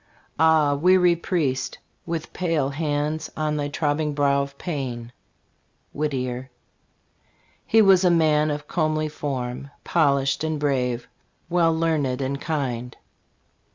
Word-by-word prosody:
Ah, 160 -3 +4
weary 180 +3 +4
priest! 160 -6 -1 0.3
with 165 -2 -4
pale 165 -6 0
hands 150 +1 -2
On 155 -1 0
thy 145 -1 -1
trobbing 150 0 -1
brow 140 -1 +2
of 140 0 -6
pain. 125 -8 -4 0.8
Whit 150 +1 -1
tier. 130 -1 -4 1.2
He 225 0 +5
was 195 -2 +6
a 180 - +5
man 155 -3 +3
of 145 0 -4
comely 155 -2 0
form, 135 -3 -4
Polished 140 -4 +2
and 160 -1 -1
brave, 125 -4 -1 0.4
well 170 -2 +4
learned 160 -6 0
and 140 +1 -3
kind. 125 -6 -3
150 Hz, 120 wpm, -24 LUFS, 140-160 Hz, 1.2 s, was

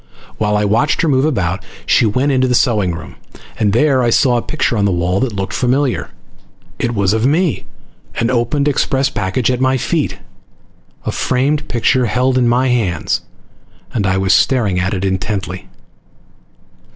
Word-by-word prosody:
While 105 -1 +1
I 105 - +1
watched 115 +12 +1
her - - +2
move 135 -1 +2
about, 95 - -1 0.2
she 115 - +3
went 130 +7 +1
into 130 -1 +2
the 125 - +1
sewing 105 -9 +1
room, 80 - -10 0.4
and 105 -2 +2
there 130 +4 +3
I 120 - +2
saw 120 +1 +3
a - - 0
picture 145 -3 -1
on 100 -2 +1
the 100 - +2
wall 90 +2 0
that 125 -5 -2
looked 95 -1 -4
familiar. 130 +1 0 0.7
It 120 -1 -1
was 100 -1 +1
of 110 +3 +1
me, 160 +1 0 0.5
an 115 +2 0
opened 130 +4 0
express 135 -1 +1
package 105 +4 -1
at 125 0 -2
my 130 0 +2
feet, - - -1 0.9
a - - -1
framed 145 +4 0
picture 120 +1 +1
held 125 +3 +1
in 120 - +2
my 125 +2 +2
hands, 100 -10 0 0.7
and 100 -4 0
I 95 0 +1
was 95 +1 +2
staring 105 -9 +2
at 95 +3 -1
it 95 +1 -2
intently. 95 -1 -3
120 Hz, 175 wpm, -16 LUFS, 100-130 Hz, 0.9 s, she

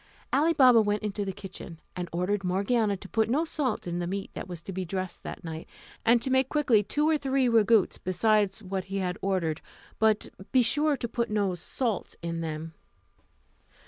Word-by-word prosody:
Ali 315 +4 +4
Baba 255 -6 +7
went 205 0 0
into 205 -1 -2
the 195 - -2
kitchen, 190 -4 -9 0.2
and 180 -1 -4
ordered 190 +4 -1
Morgiana 200 +3 +1
to 195 - -11
put 220 +2 +1
no 295 +7 +2
salt 275 -8 -2
to 175 - -5
the 175 0 -2
meat 195 +2 -4
that - - -6
was 175 -2 -7
to 195 - -6
be 185 +1 -2
dressed 185 0 -4
that - - -7
night; 160 -1 -6 0.4
and 235 0 +4
to 265 - -2
make 260 0 +3
quickly 270 -8 +3
two 295 +9 0
or 315 -1 +3
three 270 -2 +1
ragouts 225 -2 +4
besides 205 +2 +2
what 190 0 -3
he 195 +1 -4
had 180 -2 -2
ordered, 180 -5 0 0.4
but 220 -1 +2 0.2
be 255 -2 +5
sure 295 +4 +2
to 235 - -3
put 235 0 -2
no 205 -3 +1
salt 215 +5 -3
in 170 0 -3
them. 160 0 -5
205 Hz, 195 wpm, -28 LUFS, 185-240 Hz, 0.4 s, Baba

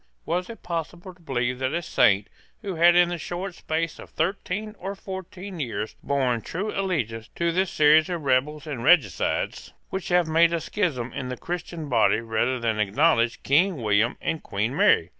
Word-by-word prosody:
Was 180 +2 -1
it 230 - -10
possible 175 +2 -5
to 180 - -25
believe 125 -4 -2
that 130 +3 -1
a 170 - 0
saint, 100 -8 +3 0.4
who 195 -2 -3
had, 170 +1 +5
in 175 0 +5
the 175 -1 -3
short 180 +4 -5
space 165 0 -3
of - - -11
thirteen 200 +5 -2
or 195 +2 -5
fourteen 190 -1 -8
years, 115 -5 -3
borne 130 -4 0
true 200 - -4
allegiance 130 - -2
to 170 0 +1
this 185 +2 +1
series 155 +2 +5
of 175 -3 -3
rebels 140 +3 +1
and 140 -6 -5
regicides, 170 +2 +2 0.2
would 190 -1 -4
have 175 -2 +3
made 165 +1 +4
a 170 - +1
schism 150 - -2
in 130 -2 -4
the 125 - -4
Christian 170 -2 -5
body 110 -5 +3
rather 115 +3 0
than 115 -2 -1
acknowledge 115 +3 +2
King 165 +4 +3
William 110 +1 +2
and 160 -2 -2
Queen 110 +6 -2
Mary? - - +4
160 Hz, 180 wpm, -25 LUFS, 125-175 Hz, 0.4 s, had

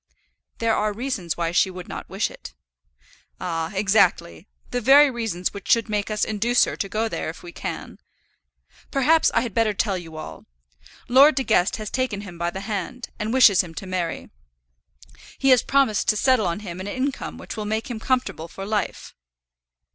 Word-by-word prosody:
"There 230 -1 +1
are 210 0 0
reasons 210 - -3
why 170 -1 -1
she 180 +2 +3
would 180 -1 -9
not - - -7
wish - - -1
it." - - -12 0.8
"Ah, 165 -2 -3
exactly; 195 - +2 0.2
the 245 - -1
very 275 +4 +7
reasons 225 -7 -3
which 200 -2 -9
should 230 -2 +3
make 210 -1 -1
us 215 0 0
induce 230 +3 +2
her - - -4
to 195 - -4
go 220 +3 0
there 220 - -4
if 165 - -9
we 175 - -9
can. - - -6 0.9
Perhaps 310 +4 +3
I - - +4
had 235 -4 -4
better 220 -1 +1
tell 195 -2 0
you 165 -2 -10
all. 155 - -9 0.6
Lord 275 +4 +6
De 265 - 0
Guest 195 -6 +2
has 215 -1 -6
taken 255 -6 -1
him 180 -5 -10
by 170 0 0
the 190 +2 -6
hand, 220 +4 -5
and 215 +1 -2
wishes 230 -7 +6
him 165 -3 -10
to 195 - -6
marry. 180 -3 -3 1.1
He 270 - +2
has 255 -2 +6
promised 270 -7 +2
to 215 - +3
settle 255 -4 +3
on 170 +4 -3
him 180 -3 -7
an 190 - -6
income 260 +5 -3
which - - -8
will 215 -2 -4
make 220 +1 -2
him 225 - -4
comfortable 250 -9 -1
for 195 +3 -8
life." 210 -2 -3
210 Hz, 190 wpm, -23 LUFS, 185-245 Hz, 1.1 s, very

